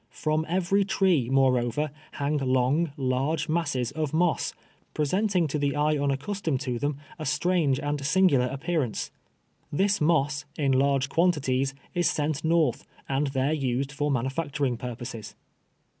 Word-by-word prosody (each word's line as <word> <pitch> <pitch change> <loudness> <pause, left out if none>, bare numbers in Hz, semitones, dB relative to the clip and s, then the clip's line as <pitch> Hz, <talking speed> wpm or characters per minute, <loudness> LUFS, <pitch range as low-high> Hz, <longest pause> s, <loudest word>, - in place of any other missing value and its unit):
From 155 +1 0
every 190 +3 +2
tree, 190 - +2
moreover, 130 +1 +2 0.3
liang 145 +1 0
long, 135 +5 +1
large 135 +4 0
masses 145 -7 -1
of 155 0 -2
moss, 175 0 +1 0.4
presenting 180 +3 +1
to 150 - -1
the 145 0 0
eye 150 +1 +2
unaccustomed 145 +3 -1
to 125 -3 -2
them, 145 +1 -1 0.2
a 155 - -4
striking 165 -5 +2
and 145 -1 -2
singular 145 -4 +3
appear 155 +5 -1
ance. 120 -6 -3 0.6
This 200 +5 +1
moss, 150 -2 +2
in 140 -3 +1
lai'ge 135 0 +2
(}uantities, 135 -6 +1 0.2
is 175 -2 +2
sent 150 -1 -1
north, 160 -5 +2 0.2
and 140 +2 0
there 135 +2 0
used 135 -2 -1
for 145 0 -1
manufacturing 135 0 -1
purposes. 115 -3 -7
145 Hz, 140 wpm, -27 LUFS, 135-160 Hz, 0.6 s, singular